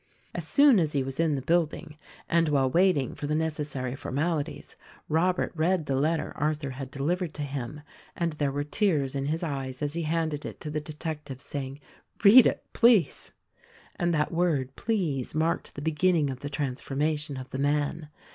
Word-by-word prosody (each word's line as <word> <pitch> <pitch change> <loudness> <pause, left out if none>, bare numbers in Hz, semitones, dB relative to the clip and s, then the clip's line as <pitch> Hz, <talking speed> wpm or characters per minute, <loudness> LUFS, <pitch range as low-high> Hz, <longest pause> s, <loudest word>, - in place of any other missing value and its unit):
As - - -5
soon 280 -6 +6
as 155 -3 0
he 140 -2 +1
was 135 +2 -5
in 160 -3 +2
the 135 - -4
building 165 0 0 0.2
— - - -20
and 165 -1 +2
while 140 -3 +3
waiting 175 -7 +3
for 145 - -5
the 150 - 0
necessary 150 -5 -2
formalities 145 +3 -3 0.2
— - - -27
Robert 180 +4 +1
read 165 0 +1
the 135 - -1
letter 155 +4 0
Arthur 150 -2 -1
had 130 0 -6
delivered 160 +5 -2
to 150 - -3
him; 140 +1 -5 0.3
and 170 -2 -1
there 145 -2 -1
were 145 +1 -2
tears 150 -4 +1
in 140 0 -2
his 160 +3 -1
eyes 135 -4 -3
as 145 0 -2
he 170 - -2
handed 160 -2 -1
it - - -7
to 150 - -5
the 150 0 -2
detective 150 -3 -6
saying, 140 -1 -5 0.4
"Read 220 +4 +9
it, - - -2
please." 230 -6 +3 0.6
And 175 0 0
that 150 -2 +1
word 150 -6 0
please 170 - -1
marked 160 +2 -1
the 145 - -6
beginning 160 -2 +2
of 130 - -7
the 145 - -5
transformation 145 +2 -2
of 130 0 -8
the 135 - -4
man. 150 +2 0
150 Hz, 185 wpm, -27 LUFS, 140-165 Hz, 0.6 s, Read